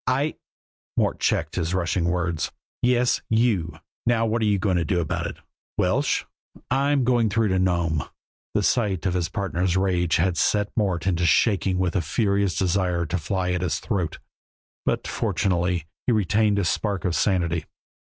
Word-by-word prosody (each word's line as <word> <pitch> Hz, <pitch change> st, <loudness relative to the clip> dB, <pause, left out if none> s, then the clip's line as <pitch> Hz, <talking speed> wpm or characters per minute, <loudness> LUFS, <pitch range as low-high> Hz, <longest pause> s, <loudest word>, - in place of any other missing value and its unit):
"I 135 Hz, +4 st, +1 dB, 0.3 s
" -, -, -60 dB
Mort -, -, +1 dB
checked -, -, 0 dB
his 85 Hz, +2 st, 0 dB
rushing 90 Hz, -1 st, 0 dB
words. 85 Hz, -3 st, -1 dB, 0.3 s
"Yes, 125 Hz, 0 st, +2 dB
you! 110 Hz, -7 st, +1 dB, 0.3 s
Now, 115 Hz, -1 st, +3 dB
what 115 Hz, +1 st, 0 dB
are -, -, +2 dB
you 105 Hz, -1 st, +3 dB
going 95 Hz, -1 st, +1 dB
to 85 Hz, -, +1 dB
do 90 Hz, 0 st, 0 dB
about 80 Hz, -, -2 dB
it? -, -, -7 dB, 0.4 s
Welsh?" -, -, +1 dB, 0.5 s
"I'm 140 Hz, +1 st, +2 dB
going 120 Hz, -2 st, +3 dB
through 110 Hz, +1 st, +1 dB
to 95 Hz, 0 st, +1 dB
Nome." 85 Hz, -4 st, +1 dB, 0.5 s
The -, -, +2 dB
sight 100 Hz, -7 st, +1 dB
of 95 Hz, -, +1 dB
his 90 Hz, -2 st, -1 dB
partner's 90 Hz, -1 st, -1 dB
rage 90 Hz, -4 st, +1 dB
had 85 Hz, +1 st, +1 dB
set 105 Hz, -1 st, +1 dB
Mort 95 Hz, -6 st, 0 dB
to 90 Hz, -2 st, 0 dB
shaking 95 Hz, 0 st, +3 dB
with 90 Hz, -2 st, 0 dB
a 95 Hz, -, +2 dB
furious 100 Hz, +2 st, 0 dB
desire 90 Hz, -2 st, +1 dB
to 85 Hz, +4 st, -2 dB
fly 90 Hz, +3 st, -1 dB
at 90 Hz, -, -1 dB
his 90 Hz, -, -1 dB
throat, 95 Hz, -8 st, -2 dB, 0.7 s
but -, -, 0 dB
fortunately, 90 Hz, -3 st, 0 dB, 0.2 s
he 125 Hz, -, +4 dB
retained 105 Hz, 0 st, +2 dB
a 100 Hz, -, +1 dB
spark 100 Hz, +3 st, -1 dB
of 90 Hz, -2 st, 0 dB
sanity. 85 Hz, -5 st, +1 dB
95 Hz, 175 wpm, -24 LUFS, 85-105 Hz, 0.7 s, he